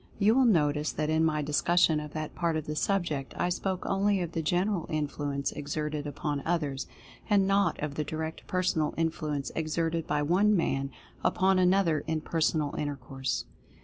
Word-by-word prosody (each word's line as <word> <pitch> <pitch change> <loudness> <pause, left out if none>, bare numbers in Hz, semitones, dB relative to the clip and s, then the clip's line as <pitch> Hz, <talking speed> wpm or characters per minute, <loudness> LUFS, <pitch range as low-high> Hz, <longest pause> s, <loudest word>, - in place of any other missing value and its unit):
You 210 +1 +4
will 265 +1 +4
notice 150 -7 +2
that 155 0 -1
in 160 0 +3
my 155 -2 +1
discussion 155 +2 +3
of 150 -1 -7
that 155 -1 -4
part 170 -2 0
of 155 - -4
the 150 - -4
subject 155 -7 -1
I 175 - +1
spoke 185 +1 -2
only 195 0 +2
of 170 - -5
the 165 - -2
general 175 +2 0
influence 145 -2 -2
exerted 150 0 -3
upon 145 0 -3
others, 150 -6 -1 0.4
and 200 -2 +4
not 200 +1 +2
of 150 -1 -2
the 150 - -2
Direct 160 +2 -5
Personal 175 -4 0
Influence 155 -3 -1
exerted 165 +1 -1
by 150 0 +1
one 195 +7 +3
man 135 -5 0 0.3
upon 190 0 +3
another 180 -4 +3
in 160 -1 -1
personal 155 -2 0
intercourse. 135 -2 -3
155 Hz, 170 wpm, -29 LUFS, 150-180 Hz, 0.4 s, You